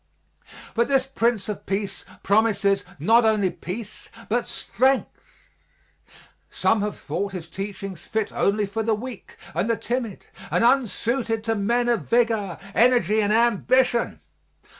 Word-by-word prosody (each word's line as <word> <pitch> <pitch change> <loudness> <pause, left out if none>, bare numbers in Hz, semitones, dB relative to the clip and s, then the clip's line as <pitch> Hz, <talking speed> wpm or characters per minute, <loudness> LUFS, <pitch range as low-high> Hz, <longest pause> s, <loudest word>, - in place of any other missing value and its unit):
But 235 0 +2
this 270 -2 +2
Prince 235 -5 0
of 210 -2 -6
Peace 195 +1 -3 0.2
promises 200 -1 +2
not 225 +11 +4
only 215 -4 +2
peace 210 +3 -8 0.2
but 240 +2 0
strength. 265 - -2 1.0
Some 225 -2 +1
have 210 0 -3
thought 200 0 -4
His 180 -4 -5
teachings 195 -1 -6
fit 220 +2 -2
only 205 +1 +1
for 200 +3 -3
the 220 0 +1
weak 245 +3 -9 0.2
and 215 - -1
the 230 - +2
timid 235 -4 -3 0.2
and - - +1
unsuited 235 -2 +1
to 225 0 0
men 235 +4 +1
of 240 -2 0
vigor, 225 -6 +1 0.2
energy 235 -2 +4
and 205 0 +1
ambition. 235 +2 +2
220 Hz, 135 wpm, -24 LUFS, 200-240 Hz, 1.0 s, not